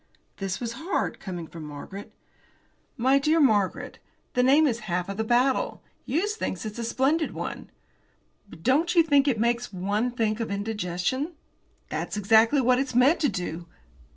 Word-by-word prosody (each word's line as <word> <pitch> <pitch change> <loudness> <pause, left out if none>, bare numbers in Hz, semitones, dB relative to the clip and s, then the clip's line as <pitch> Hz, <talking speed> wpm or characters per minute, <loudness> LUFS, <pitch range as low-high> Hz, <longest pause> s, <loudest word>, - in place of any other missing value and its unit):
'" - - -43
This 195 -1 -2
was 235 -1 -4
hard, 355 +5 -2
coming 175 -4 -6
from 160 0 -10
Margaret. 150 +7 -9 0.9
"My 265 +3 +3
dear 310 +3 +2
Margaret, 210 -9 +1 0.3
the 250 - +2
name 280 +5 +5
is 235 -5 0
half 180 +3 -2
the 220 - -1
battle. 255 - +1 0.2
Hughes 385 - 0
thinks 190 - -4
it's 215 +2 -6
a - - -2
splendid 275 +7 0
one." - - -6 0.8
"But 165 - -13
don't 310 +8 +2
you 335 - +7
think 285 -3 +3
it 245 -6 +1
makes 235 +1 0
one 205 +5 -1
think 225 -3 -1
of 230 - -3
indigestion?" 205 - -2 0.6
"That's - - -3
exactly 220 +7 +4
what 250 0 +3
it's 265 -2 -2
meant 265 +7 +5
to 290 - +2
do." 175 -3 -5
235 Hz, 165 wpm, -26 LUFS, 200-275 Hz, 0.9 s, you